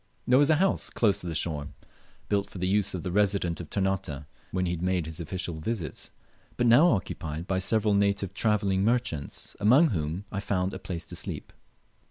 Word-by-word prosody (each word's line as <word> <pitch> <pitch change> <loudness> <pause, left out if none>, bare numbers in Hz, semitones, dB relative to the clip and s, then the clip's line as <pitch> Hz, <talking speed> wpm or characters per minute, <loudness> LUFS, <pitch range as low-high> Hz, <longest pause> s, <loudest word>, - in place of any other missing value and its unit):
There 125 +2 +5
was 145 +1 +5
a 155 - +6
house 190 +5 +1
close 105 -4 +1
to 90 - -5
the 80 - -3
shore, 75 -3 -1 0.6
built 100 -1 0
for - - -10
the 90 +1 -1
use 100 0 +2
of 90 - -5
the 90 - -3
Resident 100 -3 +1
of 80 - -10
Ternate 95 -7 -1 0.2
when 90 0 -1
he 90 0 -1
made 90 -1 0
his 80 +1 -6
official 85 -1 -4
visits, 85 - -4 0.5
but 120 - +2
now 120 +9 +7
occupied 85 - -2
by 95 0 0
several 105 +2 +2
native 100 -1 +1
travelling 100 -3 +1
merchants, 115 - -1
among 130 +11 +5
whom 80 +2 -2
I 100 - -2
found 95 -1 -1
a 95 - -5
place 90 -3 -5
to - - -8
sleep. - - -6
95 Hz, 195 wpm, -28 LUFS, 85-105 Hz, 0.6 s, now